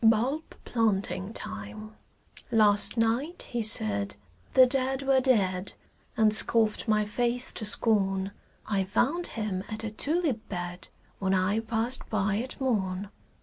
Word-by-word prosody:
BULB 240 Hz, +8 st, +1 dB
PLANTING 200 Hz, -4 st, -1 dB
TIME 105 Hz, -, -7 dB, 0.6 s
Last 210 Hz, 0 st, +4 dB
night 235 Hz, +10 st, -1 dB
he 240 Hz, -, -3 dB
said 105 Hz, -, +4 dB, 0.4 s
the 260 Hz, -, +8 dB
dead 265 Hz, +1 st, -1 dB
were 270 Hz, -1 st, +2 dB
dead 200 Hz, -8 st, 0 dB, 0.4 s
And 215 Hz, -1 st, +3 dB
scoffed 220 Hz, 0 st, +5 dB
my 215 Hz, -1 st, +1 dB
faith 240 Hz, +3 st, -2 dB
to 215 Hz, -, -4 dB
scorn; 195 Hz, -3 st, +1 dB, 0.3 s
I 200 Hz, -2 st, -1 dB
found 275 Hz, -, -1 dB
him 200 Hz, -4 st, -3 dB
at 215 Hz, 0 st, -6 dB
a 220 Hz, -, -4 dB
tulip 295 Hz, +2 st, -1 dB
bed 175 Hz, -1 st, -6 dB, 0.3 s
When 190 Hz, -1 st, 0 dB
I 190 Hz, +4 st, 0 dB
passed 225 Hz, +3 st, -3 dB
by 205 Hz, -1 st, -1 dB
at 250 Hz, +4 st, -6 dB
morn. 200 Hz, -7 st, -2 dB
215 Hz, 135 wpm, -27 LUFS, 195-245 Hz, 0.6 s, the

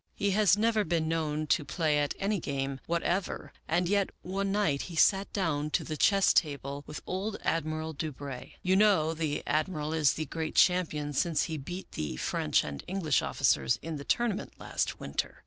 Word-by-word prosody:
" -, -, -42 dB
He 200 Hz, -, +3 dB
has 205 Hz, -1 st, +4 dB
never 220 Hz, 0 st, +2 dB
been 165 Hz, -3 st, 0 dB
known 155 Hz, -1 st, -1 dB
to 150 Hz, -, +2 dB
play 150 Hz, +1 st, +1 dB
at 145 Hz, -1 st, -1 dB
any 200 Hz, 0 st, 0 dB
game 135 Hz, -2 st, -3 dB
what 170 Hz, 0 st, 0 dB
ever, 185 Hz, +1 st, -2 dB
and 175 Hz, +2 st, +1 dB
yet 200 Hz, +1 st, +2 dB
one 195 Hz, +2 st, -2 dB
night 195 Hz, -9 st, +1 dB
he 170 Hz, -, -7 dB
sat 195 Hz, +4 st, +4 dB
down 150 Hz, -6 st, -1 dB
to -, -, -7 dB
the 155 Hz, -, -4 dB
chess 195 Hz, +5 st, +4 dB
table 140 Hz, -2 st, 0 dB
with 150 Hz, -, -7 dB
old 195 Hz, +4 st, -3 dB
Admiral 155 Hz, 0 st, -1 dB
Du 155 Hz, +1 st, -3 dB
Brey. 135 Hz, -2 st, -8 dB
You 185 Hz, +1 st, +3 dB
know 190 Hz, -6 st, +4 dB
the 155 Hz, -2 st, -2 dB
Admiral 155 Hz, 0 st, -1 dB
is 155 Hz, -4 st, +3 dB
the 155 Hz, -, -3 dB
great 160 Hz, +2 st, -4 dB
champion 155 Hz, -5 st, +3 dB
since 165 Hz, +2 st, +1 dB
he 160 Hz, -, -3 dB
beat 175 Hz, +7 st, -7 dB
the 75 Hz, -4 st, -4 dB
French -, -, +1 dB
and 70 Hz, -1 st, -6 dB
English 175 Hz, -, +1 dB
officers 65 Hz, -2 st, +2 dB
in 165 Hz, -1 st, -4 dB
the 140 Hz, -, -7 dB
tournament 220 Hz, -, -1 dB
last -, -, -2 dB
winter. -, -, -3 dB
160 Hz, 195 wpm, -30 LUFS, 150-190 Hz, -, has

